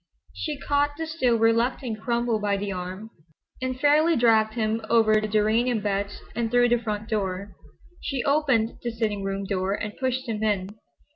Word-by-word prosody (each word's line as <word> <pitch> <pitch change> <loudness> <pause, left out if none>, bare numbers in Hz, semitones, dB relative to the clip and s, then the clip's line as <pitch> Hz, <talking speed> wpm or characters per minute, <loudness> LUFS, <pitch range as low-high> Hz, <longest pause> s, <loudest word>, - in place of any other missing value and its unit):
She 305 -2 -4
caught 290 +1 0
the 325 - -3
still 285 -7 +1
reluctant 230 0 +1
Cromwell 235 -1 0
by 205 -1 0
the 200 0 -3
arm 185 +4 -6 0.5
and 255 0 -3
fairly 305 +3 +4
dragged 220 -2 +3
him 220 -1 0
over 215 -2 +4
the 215 - -2
geranium 220 +3 +2
beds 200 0 -2
and 235 -1 -1
through 245 +1 +4
the 240 0 +3
front 215 -2 -4
door. 195 -2 -3 0.5
She 270 -3 -2
opened 270 -6 +1
the 240 - -2
sitting 220 -3 -2
room 195 0 -3
door 190 0 -1
and 210 0 -5
pushed 260 0 -2
him 220 -2 -3
in. 200 -3 0
225 Hz, 170 wpm, -25 LUFS, 210-245 Hz, 0.5 s, fairly